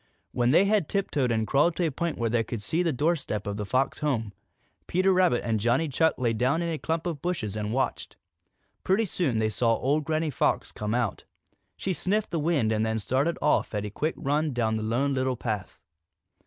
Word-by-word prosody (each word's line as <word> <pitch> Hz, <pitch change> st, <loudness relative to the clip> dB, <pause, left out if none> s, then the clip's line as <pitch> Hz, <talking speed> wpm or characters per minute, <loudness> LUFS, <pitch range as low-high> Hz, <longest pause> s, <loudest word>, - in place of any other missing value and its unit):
When 120 Hz, 0 st, +1 dB
they 170 Hz, +8 st, +5 dB
had 200 Hz, -5 st, +1 dB
tiptoed 150 Hz, -, 0 dB
and 110 Hz, -1 st, +1 dB
crawled 150 Hz, +8 st, +2 dB
to 175 Hz, -, 0 dB
a 160 Hz, -, 0 dB
point 170 Hz, +3 st, -2 dB
where 115 Hz, -1 st, -1 dB
they 115 Hz, -1 st, +2 dB
could 110 Hz, -1 st, -5 dB
see 165 Hz, +10 st, 0 dB
the 170 Hz, -2 st, +1 dB
doorstep 140 Hz, -, -1 dB
of 100 Hz, -1 st, -3 dB
the 105 Hz, -1 st, -4 dB
Fox 130 Hz, +5 st, 0 dB
home, 115 Hz, -9 st, -1 dB, 0.5 s
Peter 185 Hz, +2 st, +3 dB
Rabbit 180 Hz, -9 st, +3 dB
and 115 Hz, -2 st, 0 dB
Johnny 120 Hz, +9 st, +2 dB
Chuck 160 Hz, +3 st, +2 dB
lay 120 Hz, -3 st, +1 dB
down 130 Hz, +9 st, +1 dB
in 170 Hz, -, -2 dB
a 160 Hz, -2 st, -3 dB
clump 165 Hz, +1 st, -2 dB
of 165 Hz, -5 st, -3 dB
bushes 135 Hz, -, -2 dB
and 105 Hz, 0 st, -3 dB
watched. 130 Hz, +3 st, -2 dB, 0.7 s
Pretty 195 Hz, +4 st, +2 dB
soon 145 Hz, -, -1 dB
they 110 Hz, 0 st, +2 dB
saw 115 Hz, +2 st, +2 dB
old 145 Hz, +6 st, 0 dB
Granny 155 Hz, +1 st, -1 dB
Fox -, -, 0 dB
come 105 Hz, +2 st, -3 dB
out. 120 Hz, -5 st, -1 dB, 0.5 s
She 190 Hz, -, -1 dB
sniffed 205 Hz, +5 st, -1 dB
the 170 Hz, -, -1 dB
wind 145 Hz, -8 st, +1 dB
and 110 Hz, 0 st, +1 dB
then 110 Hz, 0 st, 0 dB
she -, -, -3 dB
started 140 Hz, +6 st, 0 dB
off 150 Hz, -6 st, +2 dB
at 105 Hz, 0 st, -2 dB
a 105 Hz, -, -5 dB
quick 155 Hz, +8 st, -2 dB
run 150 Hz, +1 st, 0 dB
down 110 Hz, -2 st, 0 dB
the 110 Hz, -, -2 dB
Lone 125 Hz, +6 st, 0 dB
Little 130 Hz, -1 st, 0 dB
Path. 105 Hz, -5 st, -4 dB
135 Hz, 220 wpm, -27 LUFS, 115-165 Hz, 0.7 s, they